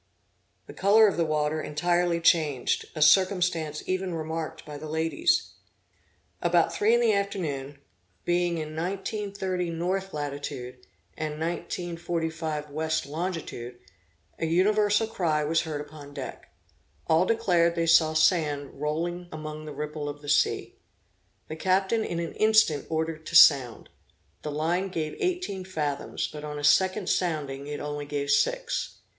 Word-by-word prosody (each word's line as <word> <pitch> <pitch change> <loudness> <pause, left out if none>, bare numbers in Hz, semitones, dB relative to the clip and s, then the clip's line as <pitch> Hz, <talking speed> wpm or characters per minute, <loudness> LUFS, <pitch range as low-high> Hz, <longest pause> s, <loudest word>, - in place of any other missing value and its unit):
The - - -11
color 210 +3 +5
of 200 - 0
the 170 - +1
water 155 0 0
entirely 175 +3 +1
changed, 155 -6 +2
a 155 - +3
circumstance 180 -4 +3
even 185 -1 -2
remarked 160 0 -5
by 150 -1 -8
the 155 +1 -7
ladies. 325 - +1 0.9
About 170 -1 +2
three 210 +7 +3
in - - +3
the 230 -2 +3
afternoon, 155 -9 -2 0.5
being 175 -1 +1
in 155 -1 -5
19 195 +5 -3
30 185 -3 -2
north 185 +4 -2
latitude, 140 -4 -6 0.3
and 155 -1 -4
19 170 +1 -3
45 160 -3 -3
west 155 +1 -1
longitude, 150 -6 -5 0.6
an 160 - -1
universal 210 +5 +3
cry 165 -8 0
was 160 +2 +2
heard 155 -3 -4
upon 145 -1 -11
deck. 135 -3 -8 0.5
All 165 +3 +3
declared 175 -7 +2
they 165 -1 +1
saw 160 -1 +5
sand 150 -4 +1
rolling 175 +4 -2
among 155 0 -7
the 155 - -7
ripple 150 0 -4
of 145 0 -8
the 145 - -6
sea. 145 - +1 0.7
The 155 - -6
captain 190 +6 +1
in 170 - -3
an 170 -2 -4
instant 215 -10 +3
ordered 160 0 -2
to 170 - -5
sound. 135 -7 +6 0.5
The 150 - -5
line 165 +6 0
gave 160 -4 -3
eighteen 360 - -2
fathoms; 150 -6 -3
but 150 -1 -9
on 150 -1 -5
a 145 - -6
second 185 +7 +3
sounding 145 -6 -1
it 150 0 -4
only 145 0 -5
gave 145 -1 -2
six. - - 0
160 Hz, 145 wpm, -27 LUFS, 150-185 Hz, 0.9 s, sound